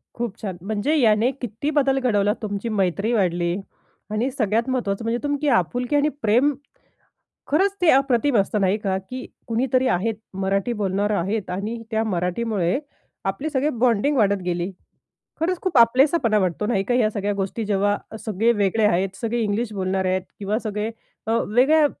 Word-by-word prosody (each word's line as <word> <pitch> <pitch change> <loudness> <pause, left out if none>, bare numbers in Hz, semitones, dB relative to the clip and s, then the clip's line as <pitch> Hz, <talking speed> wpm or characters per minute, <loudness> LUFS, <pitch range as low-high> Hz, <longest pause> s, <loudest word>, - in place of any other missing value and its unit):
खूप 230 -3 -4
छान. 190 -5 -4
म्हणजे 220 - -1
याने 225 -1 +4
किती 245 +4 -3
बदल 270 -2 +2
घडवला, 210 -5 +2
तुमची 205 +1 -3
मैत्री 200 +1 0
वाढली 175 -4 +1 0.6
आणि 225 +5 0
सगळ्यात 230 -1 0
महत्वाचं 230 -5 -1
म्हणजे 230 +1 0
तुमकी 290 +1 -1
आपुलकी 245 - 0
आणि 290 +1 +3
प्रेम 245 +7 +3 0.9
खरंच 385 +7 +2
ते 350 - +4
अप्रतिम 265 -2 +3
असतं 200 +1 +1
नाही 190 +2 +2
का, 195 -3 -1
की 255 +7 -7 0.2
कुणीतरी 255 +2 +1
आहेत, 225 +1 +1 0.2
मराठी 195 +4 0
बोलणार 200 +2 0
आहेत 200 +1 -1
आणि 210 +6 -4
त्या 220 0 +1
मराठीमुळे 185 +1 -1 0.5
आपली 195 +11 -2
सगळी 285 0 +1
बॉन्डिंग 250 +4 +2
वाढत 200 -3 +2
गेली. 175 +1 -2 0.7
खरंच 350 +2 0
खूप 370 -6 -1
आपलेसापणा 245 0 +4
वाटतो 185 +1 0
नाही 210 -4 +1
का, 245 - 0
ह्या 225 -4 +3
सगळ्या 205 -1 -2
गोष्टी 200 +3 -3
जेव्हा 205 0 +1 0.3
सगळे 220 +2 +1
वेगळे 210 0 +1
आहेत, 190 0 +2
सगळे 235 +1 -1
इंग्लिश 215 +1 -1
बोलणारे 190 -1 -1
आहेत 185 0 0 0.2
किंवा 210 +2 -1
सगळे 215 -1 -3 0.4
अ, - - -1 0.2
वेगळ्या 290 +8 +4
220 Hz, 160 wpm, -23 LUFS, 195-250 Hz, 0.9 s, याने